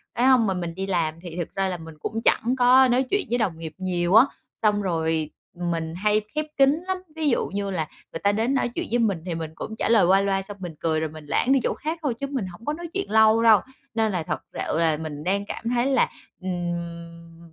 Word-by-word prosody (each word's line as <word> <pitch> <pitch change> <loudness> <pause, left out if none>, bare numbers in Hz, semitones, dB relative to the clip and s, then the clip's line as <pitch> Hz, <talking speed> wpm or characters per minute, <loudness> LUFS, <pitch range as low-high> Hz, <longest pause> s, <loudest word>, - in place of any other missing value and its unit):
phải 245 - +2
hông, 255 -4 +5
mà 190 - +1
mình 170 -2 -4
đi 190 +1 -3
làm 170 -5 0
thì 175 -2 -8
thật 175 - -2
ra 195 0 +1
là 180 - -3
mình 160 -1 -11
cũng 225 +7 -3
chẳng 245 +3 +3
có 255 +1 +6
nói 250 +2 +3
chuyện 405 0 +2
với 240 - +1
đồng 195 -9 -1
nghiệp 160 -1 -7
nhiều 180 0 0
á. 230 +4 +9 0.4
Xong 210 -2 +3
rồi 160 -4 0 0.2
mình 170 -2 -3
hay 210 +3 +2
khép 305 0 0
kín 275 +5 +4
lắm, 375 0 0 0.2
ví 315 -2 +1
dụ 240 - +1
như 200 0 -3
là 165 -5 -2 0.3
người 165 - -4
ta 200 - +4
đến 225 +6 0
nói 255 -2 +1
chuyện 235 - -4
với 240 - +2
mình 205 -6 +2
thì 175 -3 -3
mình 160 -1 -5
cũng 220 +5 -6
trả - - 0
lời 225 -5 +5
qua 190 +2 +5
loa 195 -1 +1
xong 200 +1 -8
mình 175 -4 -7
cười 160 -1 +1
rồi 160 -1 -2
mình 155 -1 -11
lảng 245 - +1
đi 270 - +4
chỗ - - +1
khác 320 +2 -4
thôi 275 -5 +1
chứ 275 +4 -5
mình 265 -8 -3
hổng 180 +6 -12
có 295 - 0
nói 340 +2 -6
chuyện 390 0 -2
lâu 220 +1 +5
đâu. 220 -3 +7 0.3
Nên 220 -1 +1
là 180 -4 -1
thật - - -3
sự 155 - -2
là 160 -2 +2
mình 150 -2 -6
đang 200 +3 0
cảm 210 - -6
thấy 240 +1 +1
là, 270 -2 +3 0.3
ừm, 170 -2 -5
195 Hz, 255 wpm, -24 LUFS, 170-240 Hz, 0.4 s, á